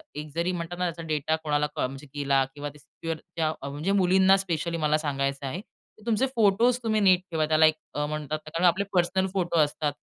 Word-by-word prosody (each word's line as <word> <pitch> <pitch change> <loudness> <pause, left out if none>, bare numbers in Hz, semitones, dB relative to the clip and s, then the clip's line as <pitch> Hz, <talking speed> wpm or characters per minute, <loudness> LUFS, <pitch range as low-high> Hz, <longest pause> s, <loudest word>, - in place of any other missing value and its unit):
एक 150 0 -6
जरी 170 +2 0
म्हणतात 175 0 -5
ना 180 - 0
त्याचा 170 -1 -4
डेटा 155 0 0
कोणाला 150 -1 +1
कॉन 155 - 0
म्हणजे 135 +2 -10
गेला 140 -2 +2
किंवा 145 0 -5
सिक्युअर 160 +3 -6 0.2
त्या 160 -2 +1 0.2
म्हणजे 150 +7 -2
मुलींना 190 0 +5
स्पेशली 170 -3 -2
मला 155 -1 +2
सांगायचं 140 -2 -2
आहे. 155 +7 -4 0.4
की 215 - -19
तुमचे 230 +2 +2
फोटोज 230 +3 +4
तुम्ही 220 -1 +1
नीट 185 -3 +5
ठेवा, 155 -1 +1
त्याला 155 0 +5
एक 155 0 +4 0.3
म्हणतात 155 0 -3
ना - - -8
कारण 165 +3 0
आपले 185 +3 +3
पर्सनल 185 +1 +2
फोटो 175 -3 0
असतात 150 -1 +1
165 Hz, 205 wpm, -26 LUFS, 150-185 Hz, 0.4 s, मुलींना